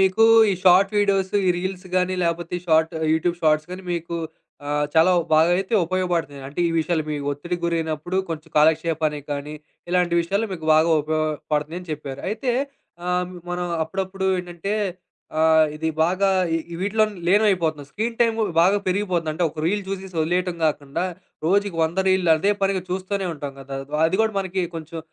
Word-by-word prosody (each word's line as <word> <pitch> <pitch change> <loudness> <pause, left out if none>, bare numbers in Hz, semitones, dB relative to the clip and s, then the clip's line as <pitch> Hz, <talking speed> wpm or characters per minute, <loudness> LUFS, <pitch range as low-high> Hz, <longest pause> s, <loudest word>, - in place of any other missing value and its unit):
మీకు 190 +4 +4 0.3
ఈ - - +2
short 185 +2 +6
videos, 195 -1 +1
ఈ - - +5
రీల్సు 185 0 -5
గానీ, 185 0 +1
లేపోతే 170 0 -2
షార్ట్ 160 0 +3 0.2
యూట్యూబ్ 170 +2 +1
షార్ట్స్ 155 +1 +2
గానీ 185 +1 -7
మీకు 170 0 -4 0.5
ఆహ్, 150 0 0
చాలా 165 +3 +5 0.2
బాగా 160 +2 +5
అయితే 195 +4 -1
ఉపయోగపడుతున్నాయి. 170 -6 -2
అంటే 145 +5 -5
ఈ - - -2
విషయాల్లో, 160 -1 0
మీ 150 - -1
ఒత్తిడికి 175 +5 -4
గురైనప్పుడు 165 +1 -2
కొంచెం 165 0 -6
కాలక్షేపానికి 155 -1 +2
గానీ, 145 +1 -5 0.4
ఇలాంటి 175 -1 +1
విషయాలు 200 +6 -1
మీకు 160 -3 -6
బాగా 160 +2 +4
ఉపయోగపడుతున్నాయని 155 +2 -2
చెప్పారు. 140 -2 -6
అయితే 225 +4 -2 0.6
ఆహ్, 180 0 -1 0.2
మనం 175 0 -2 0.2
అప్పుడప్పుడు 190 +3 -3
ఏంటంటే 180 +2 -5 0.7
ఆహ్, 160 0 +5
ఇది 160 +1 -2 0.2
బాగా 185 +4 +1 0.4
ఇ - - -5
వీటిలో 215 +3 +2 0.2
లీనమయిపోతున్నాం. 175 -7 +2
స్క్రీన్‌టైము 230 0 0 0.2
బాగా 190 +4 +4
పెరిగిపోతుంది. 180 -4 0
అంటే 175 +3 -1
ఒక 155 0 -7
రీల్ 205 +4 0
చూసేసి 190 -2 -6
ఒదిలేయటం 180 +2 0
గాకుండా, 145 +1 -1 0.4
రోజుకి 200 0 +2
100 165 +4 -3
రీలులు 185 -3 +3
అదే 200 +6 +2
పనిగా 195 -1 +1
చూస్తూనే 190 +1 -2
ఉంటాం 145 -1 -6
గదా! 135 0 -7 0.3
అది 185 +5 -1
గూడా 220 -2 0
మనకి 185 0 -2
కొంచెం 165 +1 -7
175 Hz, 155 wpm, -23 LUFS, 155-190 Hz, 0.7 s, షార్ట్